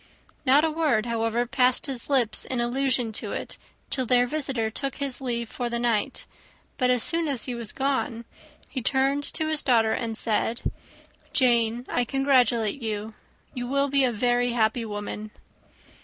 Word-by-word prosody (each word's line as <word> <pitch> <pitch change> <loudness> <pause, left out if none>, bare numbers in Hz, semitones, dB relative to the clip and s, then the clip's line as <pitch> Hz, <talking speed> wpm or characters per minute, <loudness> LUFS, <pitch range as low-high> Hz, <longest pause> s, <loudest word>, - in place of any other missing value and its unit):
Not 280 +4 +6
a 320 - 0
word, 300 -9 +1
however, 230 0 0
passed 250 +1 +2
his 260 -2 0
lips 245 -6 +2
in 255 - -3
allusion 245 -1 0
to 220 - -5
it, - - -5 0.3
till 260 -3 0
their 245 +1 +4
visitor 260 -5 -1
took 275 +4 -4
his 280 -2 -3
leave 235 -2 -2
for 240 +2 -4
the 235 - -2
night; 235 +1 -1 0.5
but 250 -1 +3
as 250 -2 +3
soon 335 -1 +1
as 275 -5 -2
he 250 - -3
was 235 -3 -4
gone, 265 -4 -1 0.4
he 260 - -4
turned 270 +3 +1
to 315 - 0
his 310 -1 +1
daughter 225 -4 +3
and 225 -2 -3
said, 225 +1 0 0.7
"Jane, 240 -2 +2
I 245 - 0
congratulate 250 -3 +2
you. 215 -1 -4 0.4
You 245 -1 -4
will 280 +2 +1
be 275 0 +3
a 255 - +3
very 245 +2 +1
happy 225 0 +1
woman." 210 0 -5
245 Hz, 170 wpm, -26 LUFS, 230-270 Hz, 0.7 s, Not